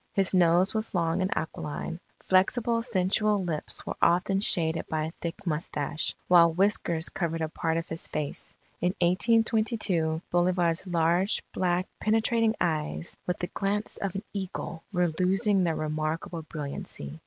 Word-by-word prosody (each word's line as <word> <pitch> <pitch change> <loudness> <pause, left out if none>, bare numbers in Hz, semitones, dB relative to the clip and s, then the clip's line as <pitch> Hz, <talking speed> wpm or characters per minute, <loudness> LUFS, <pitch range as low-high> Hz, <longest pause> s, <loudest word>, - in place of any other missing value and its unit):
His 195 -1 +1
nose 180 +1 +4
was 220 -2 -3
long 170 +1 +1
and 185 - 0
aquiline. 160 +1 -4 0.3
Flexible, 230 +5 +2
sensual 210 -2 +1
lips 160 -4 0
were - - -4
often 180 +3 +3
shaded 165 -4 +3
by 155 -1 -1
a 160 - -5
thick 170 +2 -5
mustache; 150 -2 -2
while 170 -2 +6
whiskers 175 -2 +1
covered 165 -2 -2
a 160 - -1
part 160 +1 -1
of 165 - -3
his 165 +1 -2
face. 150 -2 -3 0.2
In 180 +1 +1
1822, 205 -4 +2
Bolivar's 175 0 +1
large, 175 +3 +1
black, 180 0 0
penetrating 225 +1 +2
eyes, 160 0 -2
"with 180 - -1
the 175 - -5
glance 205 +2 -2
of 195 -2 -3
an 195 - -3
eagle," 185 -4 -5
were 180 -4 +1
losing 195 +2 +3
their 165 -2 0
remarkable 155 +2 -3
brilliancy. 140 - -6
175 Hz, 145 wpm, -27 LUFS, 165-195 Hz, 0.3 s, while